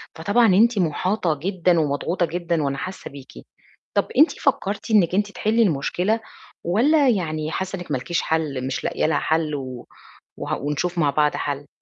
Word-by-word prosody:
فطبعًا 200 +9 +2
أنتِ 230 +1 +4
محاطة 175 -1 0
جدًا 180 -3 +2
ومضغوطة 155 +4 0
جدًا 170 -1 -2
وأنا 140 -1 -1
حاسّة 185 +6 -6
بيكِ، 140 -1 -12 0.6
طَب - - +1
أنتِ 310 - +6
فكّرتِ 210 -6 -1
إنِّك 185 -4 +4
أنتِ 205 0 0
تحلِّي 220 +3 +1
المشكلة؟ 180 +5 0 0.4
والَّا 265 - +3
يعني 155 -7 -1
حاسّة 190 +2 -3
إنِّك 175 -3 -8
ما 135 - +1
لكيش 160 +7 -2
حَل، 145 -5 -1
مش 135 - -3
لاقية - - -1
لها 155 -1 +2
حَلّ 160 -1 0
و 130 -3 -7 0.5
وه - - -3
ونشوف 150 +5 -2
مع 150 -4 +3
بعض 150 +1 +1
حَل؟ 145 0 -4
170 Hz, 170 wpm, -22 LUFS, 150-200 Hz, 0.6 s, أنتِ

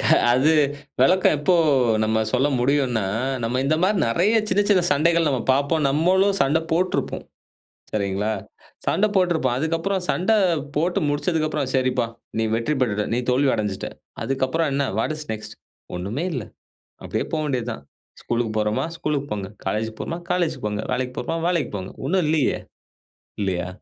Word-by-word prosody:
க - - -3 0.3
அது 130 +5 +4 0.5
விளக்கம் 185 -4 +4
எப்போ 160 +5 +2 0.5
நம்ம 110 0 +1
சொல்ல 130 +3 +3
முடியுன்னா, 125 -5 +1 0.4
நம்ம 125 +3 0
இந்த 155 +3 +2
மாரி 200 +2 +3
நிறையா 200 - +3
சின்ன 195 +2 +2
சின்ன 185 -3 +5
சண்டைகள் 165 +3 +3
நம்ம 130 -4 0
பார்ப்போம். 140 +3 +1
நம்மளும் 190 +6 +3
சண்டை 150 +4 +2
போட்டிருப்போம். 180 +2 0 0.7
சரிங்களா, 100 +1 -1 0.5
சண்டை 215 +2 +2
போட்டிருப்போம். 165 -9 +2
அதுக்கப்புறம் 165 +5 -1
சண்டை 205 +5 +2 0.4
போட்டு 175 +5 +1
முடிச்சதுக்கப்புறம். 155 -2 0
சரிப்பா, 130 -2 +1 0.3
நீ 115 - +2
வெற்றி 120 +7 0
பெற்றுட்டே, 105 -3 0
நான் 125 +1 -1
தோல்வி 135 +2 +3
அடைஞ்சுட்ட. 105 -3 -3 0.3
அதுக்கப்புறம், 135 +4 0
என்ன 140 0 +1
வாட் 155 - 0
இஸ் 150 - -7
நெக்ஸ்ட்? 110 0 -7 0.4
ஒண்ணுமே 105 - -3
இல்ல. 130 -6 -2 0.6
அப்படியே - - -2
போக 155 - +1
வேண்டியது 125 -4 -2
தான். 70 - -11 0.4
ஸ்கூலுக்கு 120 -2 -1
போறோமா, 105 +7 0
ஸ்கூலுக்கு 145 -2 -2
போங்க 100 -2 -3 0.2
காலேஜ் 110 +3 -1
போறோமா 170 +1 -4
காலேஜ்க்கு 175 -10 0
போங்க. 105 +1 -3
வேலைக்கு 125 0 -2
போறோமா 165 +7 -2
வேலைக்கு 170 -4 0
போங்க. 95 0 -6
ஒன்னும் 180 +4 +2
இல்லையே. 155 -3 +1 0.8
இல்லையா! 90 -2 -1
140 Hz, 150 wpm, -23 LUFS, 115-165 Hz, 0.8 s, சின்ன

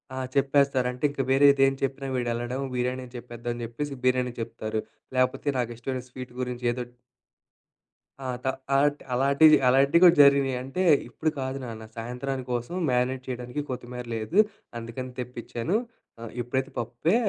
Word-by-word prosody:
ఆ! - - -5 0.2
చెప్పేస్తారు. 140 -2 +3
అంటే, 125 +2 -11
ఇంక 140 -1 -3
వేరేదేం 135 0 +6
చెప్పినా 135 0 -2
వీడు 120 -1 -1
ఎళ్ళడం 120 +3 -3
బిర్యానీ 125 +1 -1
అని 125 0 -15
చెప్పేద్దాం 120 0 -5
అని 120 - -6
చెప్పేసి 140 +5 -4
బిర్యానీ 125 -1 +2
చెప్తారు, 110 -1 -3 0.4
లాకపోతే 130 +3 +1
నాకిష్టమైన 120 +2 -3
స్వీటు 125 0 -9
గురించి 125 -1 -4
ఏదో 125 0 -3 1.4
ఆ! 135 - -7 0.2
త - - 0 0.3
అం - - +4
అలాంటి 145 +1 +2
అలాంటివి 140 +4 +6
అలాంటివి 140 +6 +5
కూడా 175 -1 +8
జరిగినాయి 140 -2 +4
అంటే, 135 +8 -2 0.3
"ఇప్పుడు 160 - -1
కాదు 130 0 -3
నాన్న 110 -2 -7
సాయంత్రానికి 125 +3 -4
కోసం 120 +8 -3
మ్యానేట్ 125 +1 +1
చేయడానికి 125 +2 -4
కొత్తిమీర 125 -1 -5
లేదు. 115 - -3 0.4
అందుకని 115 +3 -6
తెప్పిచ్చాను. 125 - -3 0.4
ఆహ్, 115 -1 -7
ఇప్పుడైతే 130 +3 -2
పప్పే 120 - 0
130 Hz, 150 wpm, -27 LUFS, 120-135 Hz, 1.4 s, కూడా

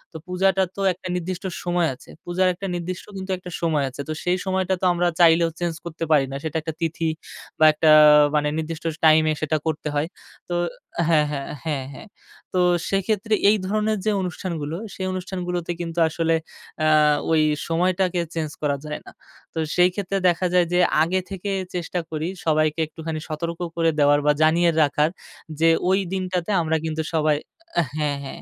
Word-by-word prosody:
তো - - -5
পূজাটা 190 +1 +2
তো 200 - -5
একটা 185 +1 -9
নির্দিষ্ট 180 +1 -4 0.2
সময় 175 -1 +1
আছে। 125 - -16 0.2
পূজার 180 +1 +1
একটা 195 +2 -6
নির্দিষ্ট 175 +1 -5
কিন্তু 190 0 -5
একটা 180 0 -10
সময় 155 -4 +1
আছে। 135 - -7
তো - - -1
সেই 180 +1 +1
সময়টা 190 0 0
তো 185 - 0
আমরা 175 0 +1
চাইলেও 165 0 +5
চেঞ্জ 175 -1 -1
করতে 165 0 -5
পারি 140 -3 +5
না। 135 - -5
সেটা 160 -1 -4
একটা 160 0 -5
তিথি 165 0 -1 0.5
বা 155 - +6
একটা 155 +1 +2 0.5
মানে 150 0 +2
নির্দিষ্ট 160 0 -4 0.2
টাইম 155 0 +6
এ - - +1
সেটা 155 0 +1
করতে 155 -1 -2
হয়। 145 +2 +1 0.4
তো 175 - -1 0.5
হ্যাঁ, 155 -3 +4
হ্যাঁ, 140 -2 -4 0.2
হ্যাঁ, 145 -5 -2
হ্যাঁ। 175 - -11 0.5
তো 185 - +1 0.3
সেক্ষেত্রে 210 +2 0 0.2
এই 215 - +4
ধরনের 215 +1 0
যে 215 - +3
অনুষ্ঠানগুলো, 170 -4 -4 0.2
সেই 190 - -4
অনুষ্ঠানগুলোতে 180 -2 -3
কিন্তু 170 0 -4
আসলে 165 +1 +1 0.5
আ - - +4 0.4
ওই 160 -1 +4 0.3
সময়টাকে 180 +1 +1
চেঞ্জ 155 -2 -3
করা 140 -2 0
যায় 150 0 -4
না। - - -11 0.4
তো 165 - -3 0.2
সেই 180 0 +5
ক্ষেত্রে 195 0 -2
দেখা 175 +1 0
যায় 180 -1 +4
যে, 180 - +3 0.2
আগে 185 +3 0
থেকে 195 +1 -4 0.2
চেষ্টা 180 +1 -2
করি 155 +1 -3 0.2
সবাইকে 155 0 +2
একটুখানি 160 0 -5
সতর্ক 165 +2 -4 0.2
করে 165 -1 +2
দেওয়ার 145 0 +5
বা 150 - +5
জানিয়ে 170 +2 +4
রাখার 150 +1 +2 0.5
যে, 165 0 +5 0.2
ওই 190 +1 +4
দিনটাতে 185 0 -2
আমরা 160 0 0
কিন্তু 160 0 -2
সবাই 155 -1 +2 0.6
হ্যাঁ, 145 -2 0
হ্যাঁ। - - -8
170 Hz, 175 wpm, -23 LUFS, 155-180 Hz, 0.6 s, বা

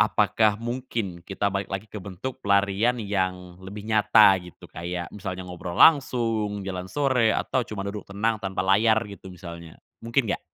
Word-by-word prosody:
apakah 110 -2 +3
mungkin 115 -6 -4
kita 95 +3 -2
balik 100 0 -2
lagi 95 +2 -4
ke 105 -1 -9
bentuk 100 +8 -7
pelarian 100 +4 +2
yang 95 -4 -3
lebih 100 +2 -8
nyata 105 -3 +5
gitu, 90 -1 -14
kayak 85 0 -5
misalnya 95 -3 -6
ngobrol 90 -1 -7
langsung, 115 -8 +3
jalan 95 -1 -5
sore, 130 -3 +2
atau 130 - 0
cuma 100 -2 -5
duduk 100 0 -6
tenang 105 +2 -1
tanpa 95 -2 -2
layar 110 +2 +4
gitu 100 -2 -10
misalnya, 85 -2 -10 0.2
mungkin 115 +3 +1
nggak? - - -4
100 Hz, 160 wpm, -25 LUFS, 95-110 Hz, 0.2 s, nyata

